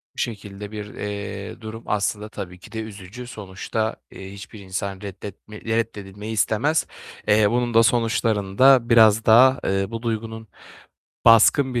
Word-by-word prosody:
Bu - - -30
şekilde 105 -2 -6
bir, 105 -1 -6
eee, 100 0 -6
durum 110 +1 -8
aslında 105 +1 -2
tabii 90 -4 -8
ki - - -15
de 110 - -5
üzücü. 110 +3 -9
Sonuçta, 110 0 -4 0.2
eee, 95 0 -10
hiçbir 100 +2 -11
insan 95 +1 -5
reddetme 100 +1 -9
reddedilmeyi 110 -2 -3
istemez. 115 +8 +1 0.4
Eee, 105 0 +4
bunun 120 -1 0
da 115 - +6
sonuçlarında, 115 +1 +3
biraz 110 -1 +5
daha, 130 +4 +6
eee, 95 0 0
bu 115 0 -6
duygunun 110 -1 -4 0.8
baskın 120 +3 +5
bir 120 - +1
110 Hz, 140 wpm, -22 LUFS, 100-115 Hz, 0.8 s, da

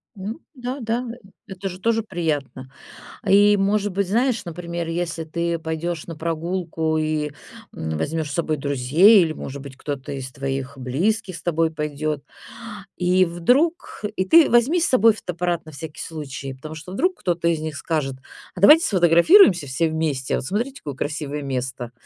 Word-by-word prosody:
Ну, 205 +7 -6 0.2
да-да, 245 -1 -3
э, 240 - -11 0.3
это 195 0 -5
же 185 0 -9
тоже 225 +2 +1
приятно. 150 -9 -3 0.6
И, 205 +1 +6
может 205 +1 +1
быть, 195 +1 -1
знаешь, 240 +4 +1
например, 170 0 -5
если 165 -1 -3
ты 170 +1 -2
пойдёшь 160 +1 -4
на 165 - -7
прогулку 165 0 -2
и, 155 -1 -1 0.4
м, 80 -1 -3
возьмёшь 155 - -2
с - - -5
собой 155 -2 0
друзей 145 - +5
или, 160 - -2
может 140 -2 -7
быть, 135 -1 -10
кто-то 140 0 -5
из 130 -1 -5
твоих 135 0 -4
близких 175 - -1
с - - -9
тобой 165 -1 +1
пойдёт, 150 -1 -3 0.7
и 180 +1 +3
вдруг, 245 - 0
и 185 - +1
ты 325 - +6
возьми 245 +9 +4
с 335 - +2
собой 230 -3 +5
фотоаппарат 175 -4 -3
на 155 - -10
всякий 155 +1 -8
случай, 140 -4 -6
потому 155 +4 -9
что 175 +4 -9
вдруг 365 - 0
кто-то 170 -2 -1
из 165 -2 0
них 155 -1 -5
скажет: 145 -5 -2 0.4
"А 180 - -7
давайте 305 +11 +8
сфотографируемся 175 - +5
все 160 +5 0
вместе, 155 -5 -1
а - - 0
вот - - -5
cмотрите, 250 +6 -2
какое 145 -2 -6
красивое 150 0 -4
место". 125 -3 -4
165 Hz, 170 wpm, -22 LUFS, 150-195 Hz, 0.7 s, давайте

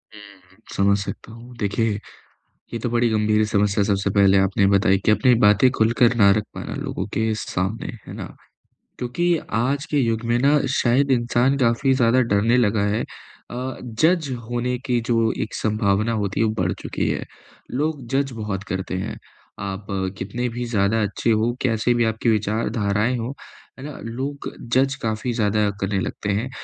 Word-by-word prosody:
हुँ, 95 -3 -16 0.2
समझ 100 0 +3
सकता 100 +2 -6
हूँ। 120 +2 -12
देखिए, 105 0 0 0.7
ये 115 - -2
तो 120 - -2
बड़ी 120 0 +2
गंभीर 110 0 +2
समस्या 100 0 +2
सबसे 100 -1 0
पहले 100 -1 +5
आपने 95 +1 +2
बताई 100 0 +4
कि - - +5
अपनी 105 +4 +4
बातें 105 +5 +5
खुलकर 115 +2 +3
ना 100 -4 +6
रख 105 - -1
पाना - - -5
लोगों - - -3
के 110 0 +1
सामने, 95 +1 -3 0.2
है - - -8
ना। - - -8 0.6
क्योंकि 170 +8 0 0.2
आज 140 +5 0
के 150 - +2
युग 115 -3 0
में 120 - +3
ना 145 +3 +4 0.2
शायद 135 +3 +2
इंसान 125 +2 +2
काफ़ी 130 +1 +2
ज़्यादा 125 0 +3
डरने 115 +5 +3
लगा 110 -3 +2
है 115 - 0 0.5
अ, 130 +2 -4
जज 155 +7 +1 0.2
होने 125 +1 -1
की 125 -2 +1
जो 115 -1 +1
एक 110 - -8
संभावना 105 0 +1
होती 100 -3 -2
है, 115 - +4
वो 110 - +1
बढ़ - - +1
चुकी - - -2
है, - - -2 0.5
लोग 145 0 -2
जज 135 -1 +1
बहुत 105 -2 -3
करते 95 0 -3
हैं। 95 - -4 0.4
आप 100 +1 -5 0.3
कितने 115 +6 -3
भी 120 +1 -4
ज़्यादा 110 -1 +1
अच्छे 105 +3 0
हो, 110 +2 +1
कैसे 120 -1 +1
भी 120 - +2
आपकी 110 +1 0
विचारधाराएँ 110 +1 0
हों, 120 +3 -3 0.5
है - - -8
ना, 150 -2 -7
लोग 135 +5 -4 0.2
जज 135 +1 +3
काफ़ी 110 +2 -2
ज़्यादा 105 -2 +1
करने 100 0 0
लगते 100 - -4
हैं। 105 +6 -1
115 Hz, 175 wpm, -22 LUFS, 105-125 Hz, 0.7 s, ना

